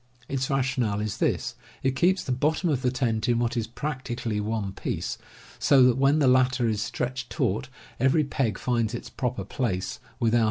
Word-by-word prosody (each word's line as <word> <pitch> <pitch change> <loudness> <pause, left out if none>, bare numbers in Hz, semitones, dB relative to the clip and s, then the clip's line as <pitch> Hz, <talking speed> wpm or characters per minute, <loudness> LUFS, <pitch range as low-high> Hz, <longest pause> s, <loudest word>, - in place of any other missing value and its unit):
Its 130 -1 -1
rationale 130 -6 +1
is 105 -1 -3
this: - - 0 0.3
It 130 0 +1
keeps 185 +7 +3
the 130 - -3
bottom 155 +7 +1
of 135 -3 0
the 125 - +2
tent 120 -3 0
in 120 - +3
what 120 +2 0
is 115 -2 -1
practically 125 -4 -3
one 105 -2 -2
piece, - - -4 0.4
so 135 -2 +6
that 125 -1 +5
when 135 +2 +4
the 145 -4 +3
latter 125 -1 +4
is 105 -2 0
stretched 125 +3 -3
taut 65 - -1 0.3
every 135 +5 +4
peg 130 -7 -1
finds 120 -2 0
its - - -7
proper 125 -6 -2
place, 95 -3 -2 0.2
without 120 0 +3
125 Hz, 185 wpm, -26 LUFS, 115-135 Hz, 0.4 s, so